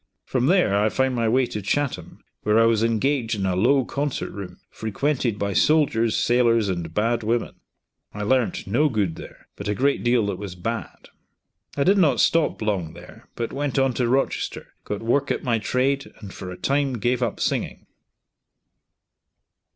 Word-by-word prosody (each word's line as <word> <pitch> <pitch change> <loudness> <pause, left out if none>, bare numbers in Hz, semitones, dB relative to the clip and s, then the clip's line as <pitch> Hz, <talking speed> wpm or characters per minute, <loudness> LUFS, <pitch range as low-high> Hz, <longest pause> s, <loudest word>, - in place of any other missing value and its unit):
From 130 0 0
there 175 - +3
I 105 +2 +3
found 130 +3 0
my 115 -2 +1
way 130 +3 +3
to 105 -3 -5
Chatham, 110 - -3 0.2
where 105 +1 +3
I 115 - +5
was 115 -1 +3
engaged 115 +1 +1
in 100 -2 -2
a 95 -1 0
low 125 +7 +3
concert 145 +1 -3
room, 100 -2 -8
frequented 120 +1 -1
by 100 -1 -2
soldiers, 115 -5 +2
sailors, 115 -3 +3
and 85 -3 -3
bad 115 +5 0
women. 115 +2 -1 0.6
I 105 - -5
learnt 125 +2 0
no 135 +10 +2
good 100 - -1
there, - - -12
but - - -7
a 105 - 0
great 140 +4 +1
deal 120 -2 +3
that 100 -2 -3
was 100 -3 -6
bad. 115 +7 -5 0.7
I 140 - +3
did 195 +4 +4
not 160 -6 +3
stop 165 -8 +2
long 95 -7 -1
there - - -14
but 115 -1 -4
went 140 0 -2
on 135 -1 +2
to 125 0 0
Rochester, 135 +3 -1
got 105 +1 -4
work 120 +5 +1
at - - -1
my 115 -3 +1
trade, 135 +4 0
and 100 -2 -10
for 90 - -7
a 90 - -7
time 140 -1 0
gave 125 +2 0
up 120 -4 -1
singing. - - -2
115 Hz, 180 wpm, -23 LUFS, 105-135 Hz, 0.7 s, I